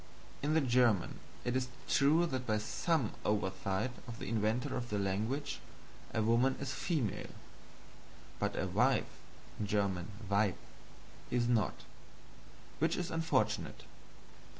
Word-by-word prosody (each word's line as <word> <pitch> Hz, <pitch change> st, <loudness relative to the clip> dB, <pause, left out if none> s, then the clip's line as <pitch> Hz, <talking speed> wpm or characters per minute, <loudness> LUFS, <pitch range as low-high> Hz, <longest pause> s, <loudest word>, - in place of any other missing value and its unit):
In 150 Hz, +2 st, +1 dB
the 160 Hz, -, +5 dB
German 120 Hz, -, +3 dB, 0.3 s
it 125 Hz, 0 st, 0 dB
is 130 Hz, -1 st, +1 dB, 0.2 s
true 155 Hz, +5 st, +5 dB
that 130 Hz, -5 st, -3 dB
by 110 Hz, -1 st, +2 dB
some 130 Hz, +4 st, 0 dB
oversight 95 Hz, +2 st, 0 dB, 0.2 s
of 115 Hz, -1 st, -6 dB
the -, -, -6 dB
inventor 110 Hz, +2 st, 0 dB
of 120 Hz, 0 st, -3 dB
the 105 Hz, -, 0 dB
language, 110 Hz, +9 st, -1 dB, 0.5 s
a 110 Hz, -, +1 dB
Woman 120 Hz, +4 st, +4 dB
is 140 Hz, -1 st, -3 dB
a -, -, -4 dB
female; 140 Hz, -, -1 dB, 1.1 s
but -, -, -1 dB
a -, -, +1 dB
Wife -, -, +2 dB, 0.4 s
(Weib) 100 Hz, 0 st, 0 dB, 0.7 s
is 120 Hz, -1 st, +2 dB
not 115 Hz, -3 st, +1 dB, 1.0 s
which 160 Hz, +4 st, +2 dB
is 180 Hz, -, -2 dB
unfortunate. 165 Hz, 0 st, 0 dB
115 Hz, 125 wpm, -34 LUFS, 105-135 Hz, 1.1 s, the